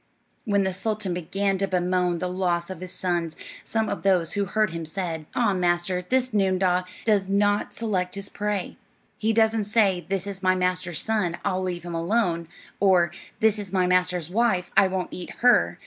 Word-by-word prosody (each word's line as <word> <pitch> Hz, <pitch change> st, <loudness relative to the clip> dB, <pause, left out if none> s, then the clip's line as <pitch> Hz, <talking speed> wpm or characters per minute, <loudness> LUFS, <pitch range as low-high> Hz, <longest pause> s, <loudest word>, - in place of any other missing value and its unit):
When 200 Hz, -3 st, +2 dB
the 190 Hz, -1 st, -1 dB
sultan 210 Hz, 0 st, -2 dB
began 195 Hz, +3 st, -1 dB
to 195 Hz, -, +1 dB
bemoan 180 Hz, -1 st, +1 dB
the 180 Hz, -, -2 dB
loss 180 Hz, -1 st, -1 dB
of 185 Hz, -, -7 dB
his 185 Hz, -1 st, -6 dB
sons, 170 Hz, -3 st, -2 dB, 0.3 s
some 220 Hz, -1 st, -1 dB
of -, -, -3 dB
those 180 Hz, -4 st, +2 dB
who 200 Hz, -1 st, 0 dB
heard 215 Hz, 0 st, +1 dB
him 165 Hz, 0 st, -5 dB
said: 160 Hz, -2 st, -4 dB
"Ah, 225 Hz, -5 st, +2 dB
master, 180 Hz, 0 st, 0 dB
this 255 Hz, -1 st, +1 dB
noondah 185 Hz, -2 st, +2 dB, 0.2 s
does 205 Hz, -4 st, +2 dB
not 205 Hz, +1 st, +2 dB
select 195 Hz, -5 st, -2 dB
his 200 Hz, 0 st, -4 dB
prey. 205 Hz, -2 st, -3 dB, 0.4 s
He 220 Hz, +1 st, +1 dB
doesn't 220 Hz, -1 st, +2 dB
say: 200 Hz, -4 st, +2 dB
'This 195 Hz, -1 st, -1 dB
is 195 Hz, -2 st, -6 dB
my 185 Hz, -1 st, +3 dB
master's 180 Hz, -2 st, 0 dB
son, 210 Hz, -6 st, 0 dB
I'll 185 Hz, -2 st, 0 dB
leave 180 Hz, -2 st, -3 dB
him 175 Hz, -1 st, -6 dB
alone,' 170 Hz, -1 st, 0 dB, 0.3 s
or, 180 Hz, -4 st, +4 dB, 0.3 s
'This 220 Hz, -1 st, +3 dB
is 200 Hz, -3 st, -6 dB
my 185 Hz, -1 st, +3 dB
master's 180 Hz, -2 st, +1 dB
wife, 195 Hz, -4 st, +1 dB
I 195 Hz, -, +6 dB
won't 185 Hz, -1 st, -2 dB
eat 180 Hz, -, -6 dB
her.' 245 Hz, +1 st, +4 dB
185 Hz, 185 wpm, -25 LUFS, 180-205 Hz, 0.4 s, I